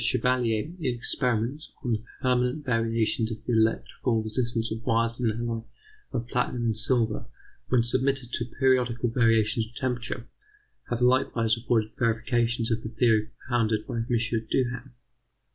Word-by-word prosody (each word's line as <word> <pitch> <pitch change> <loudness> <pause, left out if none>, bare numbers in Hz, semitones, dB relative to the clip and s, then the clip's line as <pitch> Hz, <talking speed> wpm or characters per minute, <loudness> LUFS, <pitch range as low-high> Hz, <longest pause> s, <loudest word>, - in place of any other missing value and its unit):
Chevalier 125 -3 +2 0.2
in 130 -7 -1
experiments 125 +3 -1
on 125 - -1
the 110 0 -2 0.2
permanent 125 +3 +1
variations 115 -2 +1
of 110 0 -7
the 120 - 0
electrical 115 +1 +1
resistance 115 +1 -1
of 110 +1 -4
wires 115 0 +1
of 120 -2 +2
an 110 - -2
alloy 115 -1 -2 0.5
of 120 -2 -3
platinum 125 0 -1
and 110 -1 +1
silver 115 0 +1 0.4
when 125 -2 +3
submitted 130 +1 +1
to 120 - 0
periodical 125 -1 +1
variations 115 -2 +2
of 115 - -20
temperature, 125 -1 -3 0.6
have 120 0 -2
likewise 120 -3 +3
afforded 115 -2 0
verifications 120 0 +1
of 115 0 0
the 110 - -5
theory 110 -2 +2 0.2
propounded 110 -3 +1
by - - -4
M. 115 0 -2 0.4
Duhem. 125 0 -1
120 Hz, 145 wpm, -27 LUFS, 115-125 Hz, 0.6 s, when